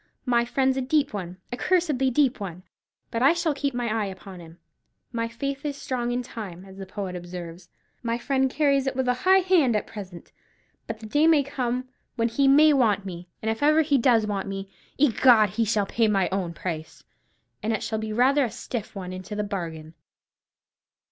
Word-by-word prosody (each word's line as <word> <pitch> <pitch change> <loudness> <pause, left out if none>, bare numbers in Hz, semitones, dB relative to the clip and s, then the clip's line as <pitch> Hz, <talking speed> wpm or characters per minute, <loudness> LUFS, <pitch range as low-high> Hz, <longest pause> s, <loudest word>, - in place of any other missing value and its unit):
My 240 -2 +2
friend's 265 +1 +1
a - - +1
deep 280 +1 +1
one, 185 -3 -5
a 245 - -3
cursedly 300 -6 +1
deep 260 -1 +2
one; 185 -3 -6 0.5
but 230 - -2
I 275 +5 +6
shall 340 -3 0
keep 280 -2 -2
my 245 -1 -1
eye 215 -2 0
upon 190 -1 -9
him 165 0 -13 0.5
'My 230 -1 -1
faith 275 +4 -4
is 290 -2 -3
strong 245 -3 -2
in 250 +1 -1
time,' 200 -7 -8
as 190 0 -13
the 195 -1 -7
poet 190 -1 -5
observes. 175 0 -8 0.3
My 235 -1 -1
friend 265 +2 +1
carries 275 -1 +2
it 265 - -1
with 260 -1 -1
a 250 - +4 0.2
high 380 0 +7
hand 345 - +3
at 210 - 0
present; 195 -5 -10 0.6
but 225 0 -6
the - - -8
day 295 +8 +3
may 310 -3 +5
come 255 -2 -2 0.3
when 230 -1 +1
he 275 +4 +2
may 300 +3 +7
want 215 -7 +2
me; 175 -2 -8
and 220 - +1
if 225 - -5
ever 305 +2 +5
he 285 -2 +2
does 230 -3 +4
want 200 -2 -3
me, 195 0 -6 0.3
egad, 240 -6 +5
he 225 +3 0
shall 210 -1 +1
pay 225 +3 +1
me 210 - +1
my 195 -2 +2
own 185 -3 -2
price, 160 -1 -6 0.6
and 220 - -1
it 220 - -1
shall 220 -1 -2
be 220 0 -4
rather 265 +6 +3
a 245 - -1
stiff 225 -1 -6
one 185 -2 -6
into 185 +3 -7
the 210 - -1
bargain." 165 -6 -5
230 Hz, 205 wpm, -25 LUFS, 195-270 Hz, 0.6 s, high